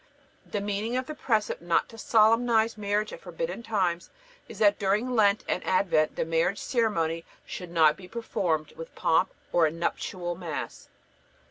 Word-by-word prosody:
The 205 - -3
meaning 210 +4 -2
of 255 - -2
the 305 - -6
precept 220 - -1
not 170 -1 +1
to 225 - -12
solemnize 225 +1 +3
marriage 210 0 -1
at - - -9
forbidden - - -5
times 190 -7 -1 0.4
is - - -9
that 205 -1 +4
during 210 +5 +1
Lent 210 -3 +3
and 180 - -1
Advent 180 -5 +2
the - - -1
marriage 165 +4 +1
ceremony 165 -11 0 0.2
should 180 -2 -7
not 160 -3 +4
be 185 - -11
performed 180 -8 -2
with 165 - -10
pomp 165 +3 +2 0.2
or 170 -2 +5
a - - -2
nuptial 175 +2 -3
Mass. 170 -4 -6
200 Hz, 160 wpm, -27 LUFS, 170-220 Hz, 0.4 s, or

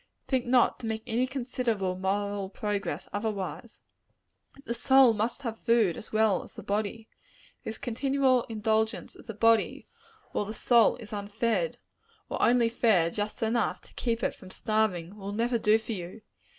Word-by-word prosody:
Think 255 -3 0
not 245 -1 +3
to 230 - -5
make 220 0 -3
any 245 +1 0
considerable 240 -7 -2
moral 200 +1 -2
progress, 205 0 -3
otherwise! 205 -2 -4 0.8
The 235 - -2
soul 265 0 +5
must 225 +6 -2
have 225 -3 -4
food, 230 -7 +3
as - - -10
well 215 -3 +3
as - - -12
the - - -8
body. 215 +2 -2 0.6
This 220 - -4
continual 265 0 +1
indulgence 220 0 -1
of - - -15
the 225 - -6
body, 225 +1 +2 0.5
while 210 - -1
the 215 +2 -6
soul 235 +1 +4
is 220 -3 -10
unfed, 220 - -1 0.5
or - - -3
only 240 -1 +4
fed 215 -8 +2
just 210 +3 -3
enough 225 0 0
to - - -18
keep 235 -1 -2
it - - +1
from 190 - -14
starving, 205 -3 -1
will 200 0 -6
never 235 +2 0
do 215 0 +4
for 225 +1 -7
you. 185 +1 -6
220 Hz, 165 wpm, -28 LUFS, 205-235 Hz, 0.8 s, soul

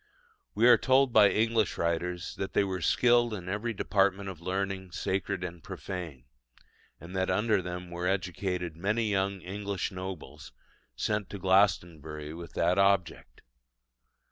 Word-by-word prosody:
We 120 - +5
are 125 - +7
told 130 -1 +3
by 105 -2 +7
English 110 -1 +1
writers 85 +2 -2
that 95 - -4
"they - - +3
were 95 -2 -3
skilled 120 -2 +3
in 90 -3 -8
every 105 +5 -2
department 100 -1 +1
of 90 -4 -9
learning 95 0 -3
sacred 95 +1 -2
and 85 -2 -6
profane"; 85 -9 -7 0.7
and 85 +3 -10
that 95 0 0
under 105 -2 +2
them 90 0 -6
were 85 +1 -3
educated 90 -2 -2
many 105 +5 0
young 95 -1 0
English 100 +1 -4
nobles, 90 -6 -8 0.4
sent 105 - -1
to 100 - -6
Glastonbury 80 -6 +1
with 85 +1 -9
that 90 +3 +2
object. 100 -4 +1
95 Hz, 145 wpm, -29 LUFS, 90-100 Hz, 0.7 s, are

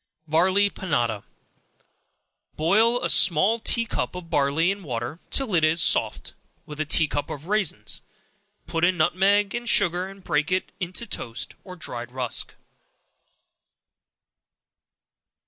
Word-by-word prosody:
Barley 190 +6 +3
Panada. 120 - -1 1.3
Boil 225 +10 +3
a - - +2
small 190 +6 +4
tea 230 +1 +2
cup 220 - -3
of 175 -2 -8
barley 145 +6 +2
in 200 +1 -5
water 125 0 -4
till 265 -7 -2
it 165 -3 +3
is 155 +2 +3
soft, - - 0 0.3
with 150 0 -9
a 155 - 0
tea 155 +1 +3
cup 145 0 -3
of 145 +1 -7
raisins; 190 - -1 0.6
put 165 0 -2
in 180 0 +3
nutmeg 195 +5 +3
and 240 -1 -2
sugar, 175 +2 +3
and 195 0 -12
break 150 +2 0
in 185 0 +2 0.2
it 185 +5 -5
toast 115 +1 -4
or 185 -2 -9
dried 120 -8 -6
rusk. 125 -2 -2
175 Hz, 130 wpm, -25 LUFS, 150-195 Hz, 1.3 s, small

